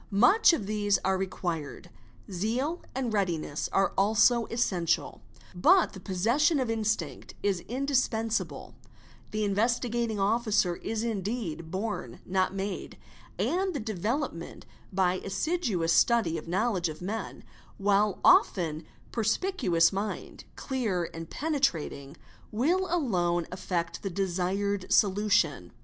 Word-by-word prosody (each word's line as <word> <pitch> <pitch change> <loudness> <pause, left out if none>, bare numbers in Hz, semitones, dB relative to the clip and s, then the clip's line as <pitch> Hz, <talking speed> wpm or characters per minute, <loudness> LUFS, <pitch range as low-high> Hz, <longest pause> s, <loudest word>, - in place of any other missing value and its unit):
Much 245 - +5
of 280 -12 -1
these 205 -1 +1
are 190 0 +2
required; 175 -5 -4 0.4
zeal 240 - -1
and 255 -4 -2
readiness 170 -7 -1
are 195 0 +2
also 220 +4 +4
essential; 185 -8 -1 0.3
but 345 - +4
the 190 - -9
possession 235 - +2
of 250 -3 0
instinct 215 - -2
is 195 -3 +1
indis 270 +1 +1
1] 225 0 -1
ensible—the 215 -1 -6
Investigating 230 +1 0
Officer 205 -4 +1
is 220 0 -3
indeed 200 -6 -3
born 190 - -4
not 185 0 +1
made—and 255 - -4
the 220 -5 -3
evelopment 210 - -3 0.3
by 185 -1 +1
assiduous 200 - 0
study 230 -8 +3
of 160 0 -6
knowledge 185 -1 0
of 155 +3 -8
men; 220 +4 -5 0.3
while 200 0 +2
often 160 -3 +4 0.3
a - - -1
e - - -1
spicuous 215 - +2
mind, 200 +2 -5
clear 215 -11 -2
and 165 0 -7
penetrating, 180 - -1 0.3
will 335 - +1
alone 180 - +1
effect 175 -2 -3
the 195 - -3
desired 190 +1 -1
olution. 190 - +2
205 Hz, 120 wpm, -28 LUFS, 180-235 Hz, 0.4 s, Much